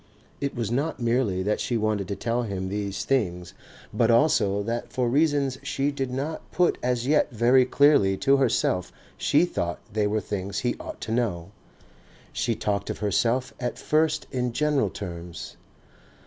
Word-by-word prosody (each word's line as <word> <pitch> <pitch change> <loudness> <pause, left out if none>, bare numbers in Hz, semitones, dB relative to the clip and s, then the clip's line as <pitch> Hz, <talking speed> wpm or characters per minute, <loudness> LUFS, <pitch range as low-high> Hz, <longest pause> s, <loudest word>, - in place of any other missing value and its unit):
It 140 -1 -3
was 115 -3 -2
not 140 +6 -1
merely 115 -6 +1
that 105 +2 0
she 120 -3 -1
wanted 105 -3 0
to 100 - -3
tell 115 +5 -1
him 95 -5 -3
these 100 0 -3
things 90 -10 -1 0.4
but 115 -1 +2
also 115 -6 +3
that 115 +2 -3
for 125 -1 0
reasons 140 0 +1
she 140 +1 -1
did 135 -2 -3
not 140 +5 -4
put 180 -1 +2
as 125 -1 0
yet 150 +3 +3
very 125 +3 +4
clearly 130 -9 +4
to 135 +6 +3
herself 115 -8 +1 0.2
she 150 +4 +3
thought 85 - -3 0.2
they 105 -1 +1
were 110 +1 0
things 100 -2 -4
he 120 - +1
ought - - -8
to 110 - -5
know. 105 -8 -1 0.8
She 115 - 0
talked 100 -1 -2
of - - -3
herself 115 +5 0
at 120 -1 -3
first 155 0 +1
in 125 -2 -1
general 150 0 +1
terms. 85 -3 -7
120 Hz, 165 wpm, -26 LUFS, 100-135 Hz, 0.8 s, very